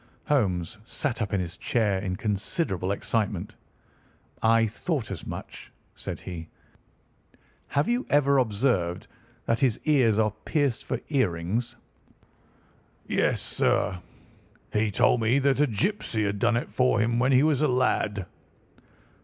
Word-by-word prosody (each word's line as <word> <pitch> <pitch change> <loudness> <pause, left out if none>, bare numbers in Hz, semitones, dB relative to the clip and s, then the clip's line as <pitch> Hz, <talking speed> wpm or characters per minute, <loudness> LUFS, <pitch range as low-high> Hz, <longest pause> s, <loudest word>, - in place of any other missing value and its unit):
Holmes 100 - 0
sat 125 +2 -3
up 105 - -2
in 100 - +1
his 85 -1 -4
chair 105 -5 +1
in 95 -2 -3
considerable 100 - -2
excitement. 105 +1 -2 0.9
"I 115 0 +4
thought 120 - -3
as - - -6
much," - - -8 0.2
said - - -6
he. 85 -3 -7 1.2
"Have 145 +1 0
you 245 +2 0
ever 140 -1 +4
observed 105 -7 0 0.4
that 115 0 +1
his 125 -6 +2
ears 130 -9 +3
are 110 -1 +2
pierced 145 -7 0
for 130 - -2
earrings?" 115 - 0 1.3
"Yes, - - +1
sir. 90 - 0 0.7
He 105 0 +2
told 115 +4 +3
me 115 +4 +3
that 140 0 +2
a 150 - +4
gipsy 115 - -1
had 100 0 -2
done 115 +2 +3
it 120 - -4
for 125 0 +2
him 115 +1 +1
when 130 +2 +3
he 130 +1 +5
was 150 -3 +2
a 150 - +4
lad." 115 -6 +1
115 Hz, 135 wpm, -26 LUFS, 100-135 Hz, 1.3 s, he